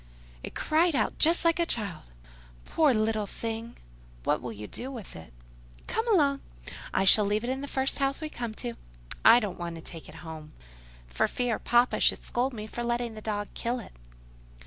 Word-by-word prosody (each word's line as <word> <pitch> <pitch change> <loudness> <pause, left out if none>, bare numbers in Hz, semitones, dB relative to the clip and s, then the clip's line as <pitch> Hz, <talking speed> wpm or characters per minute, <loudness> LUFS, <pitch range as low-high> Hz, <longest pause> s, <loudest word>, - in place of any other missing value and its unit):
"It - - -8
cried 325 +1 +2
out - - 0
just 335 +2 +5
like 335 0 +4
a 340 - +3
child." 205 - -2 0.6
"Poor 305 -3 +3
little 215 -2 +1
thing! 225 +2 -5 0.5
What - - +1
will 120 -1 -5
you 105 -1 -7
do 250 - -6
with 235 -8 -8
it?" 80 -7 -11 0.5
"Come 450 +1 -1
along—I 280 - 0
shall 210 +2 +7
leave 205 +2 0
it 245 - -1
in 265 +1 -3
the 285 - -5
first 270 0 0
house 275 0 +1
we 310 - -3
come 235 -7 -5
to. 240 0 -4 0.5
I 230 +2 +9
don't 205 -7 -4
want 170 -1 -4
to 165 - -8
take 165 -2 -9
it - - -11
home, 155 -1 -8 0.5
for - - 0
fear 245 -3 -1
papa 240 +1 +3
should - - +3
scold 250 +3 0
me 215 -4 -6
for 240 +2 -5
letting 235 -1 -1
the 215 - -9
dog 205 -1 -3
kill 240 +1 -2
it." 230 - -9
235 Hz, 190 wpm, -28 LUFS, 205-270 Hz, 0.6 s, I